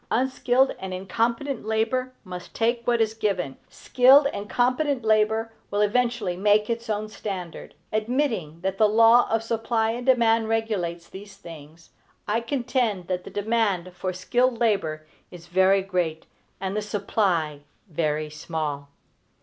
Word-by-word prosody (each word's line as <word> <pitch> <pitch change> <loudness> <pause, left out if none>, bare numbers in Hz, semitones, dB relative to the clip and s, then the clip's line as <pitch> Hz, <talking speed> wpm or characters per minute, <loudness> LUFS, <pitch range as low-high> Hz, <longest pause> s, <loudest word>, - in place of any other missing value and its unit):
Unskilled 260 +1 +2
and 190 -1 -5
incompetent 230 +8 -2
labor 225 +4 -1
must 180 -2 -9
take 235 +1 0
what 240 -1 +2
is 220 -1 +1
given; 195 -10 -2
skilled 265 +3 +5
and 205 +1 -6
competent 255 +1 +1
labor 220 +1 +2 0.2
will 205 +1 0
eventually 230 -3 +1
make 210 +3 +2
its 230 0 -4
own 215 0 -1
standard. 190 -5 -7 0.2
Admitting 215 - -1
that 190 +1 -3
the 215 -1 +5
law 230 +3 +5
of 225 0 0
supply 225 0 0
and 245 +2 -6
demand 230 -3 +3
regulates 195 -7 -2
these 195 0 -11
things, 165 -2 -13 0.4
I 215 +2 +1
contend 240 -7 -1
that 180 -1 -2
the - - -7
demand 205 -4 -1
for 185 +1 -3
skilled 245 +6 0
labor 180 -10 0 0.2
is 175 -2 -12
very 190 +2 +3
great, 175 -4 -2 0.3
and 190 +1 -3
the 210 - 0
supply 195 -7 -1 0.3
very 155 -2 -2
small. 150 -2 -4
215 Hz, 140 wpm, -25 LUFS, 180-235 Hz, 0.4 s, skilled